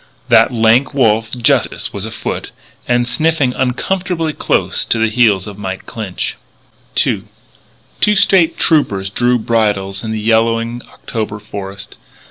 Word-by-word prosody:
That - - +5
lank 120 +4 +3
wolf, 115 -4 +2
Justice, 125 +2 0
was 100 +1 -4
afoot 110 - -5 0.4
and 120 0 +1
sniffing 155 -2 +1
uncomfortably 165 +6 -1
close - - 0
to - - +1
the 110 0 +2
heels 105 -5 +3
of 105 -1 -9
Mike 95 -1 -5
Clinch. 105 -5 -4 0.7
II - - -1 0.7
Two 210 - +4
State 180 -4 +3
Troopers 100 - +1
drew 125 +4 +2
bridles 105 -4 0
in 110 - -4
the 110 - -2
yellowing 115 +2 +1
October 110 -2 -5
forest. 100 -1 -8
115 Hz, 130 wpm, -16 LUFS, 105-130 Hz, 0.7 s, That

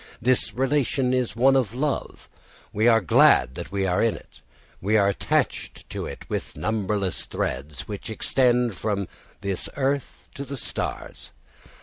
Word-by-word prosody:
This 125 -1 +2
relation 135 -1 +1
is 125 -4 0
one 135 +3 +5
of 120 -4 +1
love. 140 +2 -3 0.5
We 110 +3 +2
are 115 -1 +6
glad 65 -7 +5
that - - -7
we 100 -1 0
are 90 -1 +1
in 115 -1 +2
it; - - -15 0.4
we 105 +4 +2
are 100 -2 +4
attached 100 - -1
to - - -4
it - - -9
with - - -4
numberless 105 -3 -1
threads, 70 +2 -3
which 105 0 -6
extend 125 +1 +2
from 100 0 -2 0.3
this 100 -2 -2
earth 140 0 -2
to 140 - -6
the 140 0 -6
stars. - - -5
110 Hz, 150 wpm, -25 LUFS, 100-130 Hz, 0.5 s, are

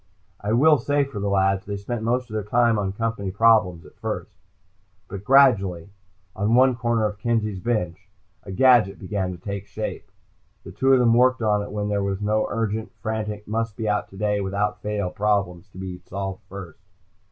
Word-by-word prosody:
I 105 - -3
will 150 +4 +5
say 145 0 +1
for 135 -7 -6
the 100 0 -1
lads, 95 -1 +1
they 100 -1 -3
spent 110 +3 -4
most 125 +3 0
of 110 - -11
their 110 - -1
time 115 +1 +2
on 95 -2 -1
Company 115 -1 -3
problems, 100 -4 +3
at - - -18
first. - - -5 0.7
But 100 +1 -7
gradually, 100 -9 +4 0.5
on 105 +4 +1
one 130 0 +5
corner 115 -2 0
of 105 -1 -3
Kenzie's 110 -3 -1
bench, 95 -4 -3 0.3
a 95 - -9
gadget 120 -2 +4
began 95 -1 -3
to 90 - -8
take 100 +2 -6
shape. 110 - -6 0.5
The - - -10
two 135 0 +1
of 135 - +7
them 120 -2 +4
worked 125 0 +3
on 105 -1 +2
it 100 - -6
when 105 0 -2
there 100 -1 0
were 100 -1 -1
no 105 +1 0
urgent, 110 -1 -2
frantic, 105 -2 -4
must 115 -1 -2
be 110 - -3
out 105 0 0
today 105 +1 -1
without 100 +2 -2
fail 105 -3 -2
problems 100 -3 -1
to 95 - -16
be 95 -1 -6
solved 95 +1 -6
first. 95 -3 -9
105 Hz, 190 wpm, -23 LUFS, 100-115 Hz, 0.7 s, of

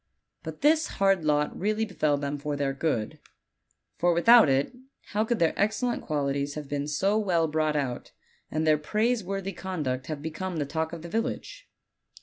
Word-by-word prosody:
But - - -8
this 310 +2 +4
hard 195 -3 +3
lot 150 -1 +1
really 215 +3 0
befell 155 -8 0
them 145 0 -3
for 145 +1 -3
their 140 -1 -1
good; 135 -7 -2 0.8
for 175 0 +3
without 230 +1 +7
it 135 - +1 0.3
how 210 +1 +1
could 235 +1 0
their 165 -4 +2
excellent 220 +4 0
qualities 140 -1 -2
have 150 -2 -6
been 145 0 -3
so 195 +8 +1
well 175 -6 +1
brought 155 0 0
out, 135 -4 -3 0.4
and 155 +1 -1
their 155 -1 +4
praiseworthy 195 +1 -1
conduct 150 -9 -3
have 150 -2 -5
become 170 +3 -4
the 145 - -1
talk 160 +2 -2
of 165 -2 -8
the - - -6
village? 255 - -4
160 Hz, 170 wpm, -27 LUFS, 145-205 Hz, 0.8 s, without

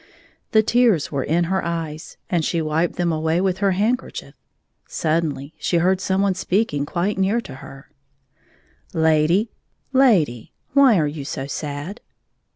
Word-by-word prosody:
The 220 0 +5
tears 230 - +2
were 140 -3 -1
in 170 +3 +1
her 190 +3 -1
eyes, 165 -2 -5
and 170 -3 0
she 170 - 0
wiped 160 +2 0
them 175 -1 0
away 160 +1 0
with 190 0 0
her 195 -1 +2
handkerchief. 220 +7 -2 0.5
Suddenly 155 -2 -2
she 175 - 0
heard 185 +2 +2
some 190 +1 +1
one 200 -1 +2
speaking 180 -6 -1
quite 190 +5 -1
near 195 +5 +2
to 215 - -10
her: 135 0 -12 0.6
" - - -35 0.2
Lady, 165 +8 +2 0.4
lady, 180 - +3 0.2
why 270 -6 +6
are 155 - +2
you 145 -1 -4
so 135 -1 -5
sad 145 +7 -5
170 Hz, 155 wpm, -21 LUFS, 155-195 Hz, 0.6 s, why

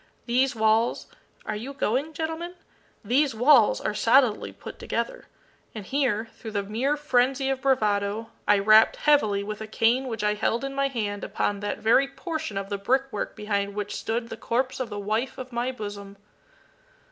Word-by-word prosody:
These 255 +2 +1
walls 220 +1 +2 0.4
are 215 - -3
you 245 +7 -6
going, 275 +5 -1
gentlemen? 325 +3 -4 0.5
these 260 +3 +2
walls 245 -1 +5
are - - -2
solidly 235 0 +3
put - - -11
together;" - - -3 0.5
and 210 -3 -6
here, 240 -5 0
through 225 - -9
the 200 -1 -1
mere 245 +9 -1
frenzy 270 -1 +1
of 265 -1 -3
bravado, 215 -4 0 0.2
I 205 0 +5
rapped 215 +2 +6
heavily 215 -10 +2
with 210 +1 -6
a 220 - -5
cane 235 +4 +2
which 225 -3 -4
I 210 0 +2
held 225 +4 -1
in 275 0 -4
my 275 0 +1
hand 210 -6 -3
upon 205 -1 -1
that 205 0 -3
very 230 +5 +3
portion 315 - -5
of 195 0 -4
the 200 -1 -3
brick 260 +7 +2
work 210 - -4
behind 200 -2 -2
which 205 -1 -4
stood 230 +1 -3
the 225 - -7
corpse 255 +4 -1
of 255 -3 -3
the 205 - -6
wife 215 +5 -2
of 255 0 -8
my 240 +2 -1
bosom. 205 -4 -8
230 Hz, 180 wpm, -26 LUFS, 210-270 Hz, 0.5 s, rapped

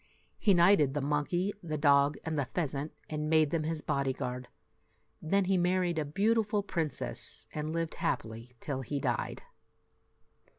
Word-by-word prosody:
He 200 -3 +4
knighted 170 -6 +5
the - - +1
monkey, 150 +7 0
the 155 -3 -3
dog, 145 0 +4
and 160 -1 -2
the 145 -3 0
pheasant, 150 -3 -1 0.2
and 150 0 -3
made 155 -2 +4
them 160 -2 0
his 160 -1 -1
body 140 -1 0
guard. 125 0 -4 0.7
Then 195 +4 +2
he 190 0 +2
married 180 -1 +1
a 155 - -1
beautiful 210 +5 +1
princess, 165 -6 -4
and 155 0 -3
lived 165 0 -2
happily 115 +2 -3
till 135 -3 -3
he 140 +3 -3
died. - - -2
155 Hz, 155 wpm, -31 LUFS, 140-175 Hz, 0.7 s, knighted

